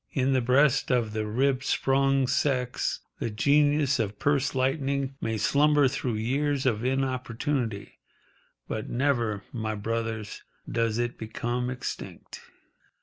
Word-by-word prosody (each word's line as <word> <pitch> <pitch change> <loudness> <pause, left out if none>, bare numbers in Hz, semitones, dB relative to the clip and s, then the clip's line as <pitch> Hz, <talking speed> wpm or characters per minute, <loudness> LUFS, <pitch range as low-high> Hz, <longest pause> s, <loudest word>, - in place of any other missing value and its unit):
In 135 -3 +2
the 130 - +3
breast 135 +3 +3
of 120 -4 +1
the 110 -1 -2
rib 130 +4 +1
sprung 135 0 +2
sex 125 -2 0 0.2
the - - -2
genius 145 +4 +3
of 105 -2 -2
purse 145 -1 +1
lightening 135 0 0
may 115 0 -1
slumber 145 +4 +4
through 125 -3 -2
years 135 +5 0
of 115 -3 +1
inopportunity, 130 -3 -2 0.7
but 110 - -4
never, 120 -6 0
my 110 -2 -2
brothers, 110 0 -3 0.3
does 115 -1 0
it 120 0 -2
become 120 +3 -3
extinct. 125 0 -6
130 Hz, 125 wpm, -27 LUFS, 115-140 Hz, 0.7 s, slumber